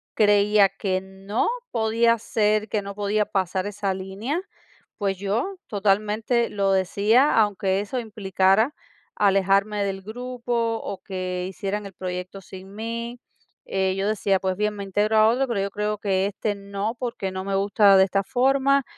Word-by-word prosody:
creía 205 -1 +5
que 195 -1 -2
no 190 +3 -3 0.2
podía 230 +1 +2
ser, 215 -1 0
que 210 - 0
no 200 0 -7
podía 210 +1 0
pasar 190 0 -1
esa 205 -1 -2
línea, 195 - -4 0.6
pues 195 -3 -1
yo 230 - -2
totalmente 215 +3 +1
lo 195 -1 0
decía, 205 +8 +3
aunque 200 -2 +2
eso 245 +5 -3
implicara 205 +2 +1 0.4
alejarme 200 +1 +2
del 195 -1 -3
grupo 235 +1 -2
o 195 - -6
que 185 -1 -4
hicieran 200 +2 -4
el 195 - -9
proyecto 180 +1 -6
sin 190 +1 -12
mí. 235 +3 -5 0.5
Eh 190 -1 0
yo 195 +1 -1
decía, 200 -2 +1
pues 185 -1 -2
bien, 210 0 0
me 200 - -5
integro 205 +3 0
a 215 0 +6
otro, 260 +3 +1
pero 225 -5 -1
yo 200 0 -2
creo 210 +1 -2
que 195 -2 0
este 205 +1 -2
no, 200 +2 -4
porque 230 -6 -3
no 190 0 -5
me 195 0 -1
gusta 200 0 +4
de 190 - +7
esta 195 +1 +1
forma, 270 +4 +2
205 Hz, 160 wpm, -24 LUFS, 195-220 Hz, 0.6 s, de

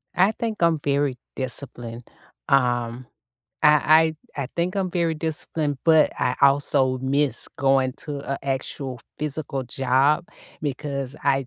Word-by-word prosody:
I 190 +4 +4
think 220 -3 -4
I'm 165 -2 +3
very 140 -2 +1 0.2
disciplined. 120 -2 -5 0.4
Um, 120 -2 +1 0.6
I 155 +1 +5 0.2
I 140 - -1
I - - -4
think 175 +3 0
I'm 190 -2 0
very 170 -2 0
disciplined, 155 -2 -2
but 160 -2 +5
I 125 0 +1
also 140 -2 +3
miss 140 +2 0
going 135 -1 +3
to 145 -2 -4
a 140 - -3
actual 135 -1 -4 0.2
physical 145 -2 -3
job 135 +6 +2 0.4
because 140 -1 -4
I 135 -1 +2
140 Hz, 130 wpm, -24 LUFS, 130-155 Hz, 0.6 s, I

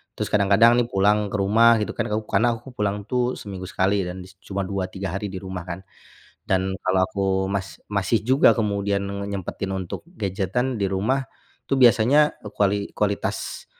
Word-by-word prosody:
Terus - - -2
kadang-kadang 105 +3 +5
nih 120 - +1
pulang 105 +2 +2
ke - - -3
rumah 115 +4 +5
gitu - - -2
kan, - - -1
kaup 110 0 -2
karena 110 +4 +3
aku 120 +4 -12
pulang 105 -1 -1
tuh 125 +1 0
seminggu 95 -3 -7
sekali 95 +1 +1
dan 90 +1 -6
dis 95 +1 -15
cuma 100 0 -3
2, 95 0 -3
3 95 -2 -4
hari 105 +1 -3
di 95 - -5
rumah 95 -2 -6
kan. 85 +1 -5 0.7
Dan 95 0 0
kalau 95 0 +2
aku 100 -1 -2 0.2
mas 100 -1 -4
masih 100 +2 +1
juga 130 +3 +5
kemudian 100 -2 0
ngenyempetin 100 -1 -4
untuk 95 -2 -5
gadgetan 115 - -2
di - - +2
rumah, 105 +8 0 0.5
tuh 135 - +2
biasanya 125 +6 +5 0.2
kuali 100 0 +1
kualitas 100 -1 -2
100 Hz, 175 wpm, -23 LUFS, 95-110 Hz, 0.7 s, kadang-kadang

